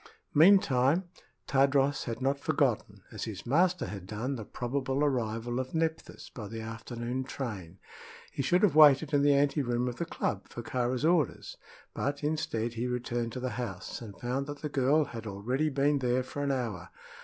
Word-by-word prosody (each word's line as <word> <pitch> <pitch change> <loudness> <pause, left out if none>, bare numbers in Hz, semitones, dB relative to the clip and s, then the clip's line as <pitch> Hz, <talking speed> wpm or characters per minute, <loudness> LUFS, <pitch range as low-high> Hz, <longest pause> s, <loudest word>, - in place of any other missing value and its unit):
Meantime 155 -3 +5 0.4
Tadros 140 +1 +2
had 115 +1 -4
not 140 +1 +1
forgotten, - - 0
as - - -5
his - - -7
master 175 +7 +2
had 95 -1 -7
done, 115 +7 -3
the 115 - -6
probable 135 +5 -2
arrival 120 -3 -1
of 130 +4 -4
Nephthys 160 0 -3
by 105 -4 -7
the 115 +2 -6
afternoon 120 +3 -4
train. 100 -10 -6 0.5
He - - -3
should 175 +9 +2
have 205 - +5
waited 150 0 +7
in 145 - +4
the 145 0 +5
ante 140 +1 +2
room 120 -1 0
of 120 -1 -4
the 170 - -2
club 100 -10 -3
for 120 - -8
Kāra's 125 +3 -1
orders; 165 -5 +1 0.4
but 140 +1 -2
instead 145 -7 -1
he 120 +2 -2
returned 120 -1 -2
to - - -4
the 130 0 -3
house 95 -4 -6
and 105 -4 -10
found 130 +3 -2
that 145 0 -7
the 150 - -2
girl 145 +3 +3
had 115 -3 -8
already 125 +10 -1
been 140 +1 +2
there 125 0 +1
for 145 +2 -6
an 140 -1 0
hour. 115 -9 -3
130 Hz, 180 wpm, -30 LUFS, 120-145 Hz, 0.5 s, waited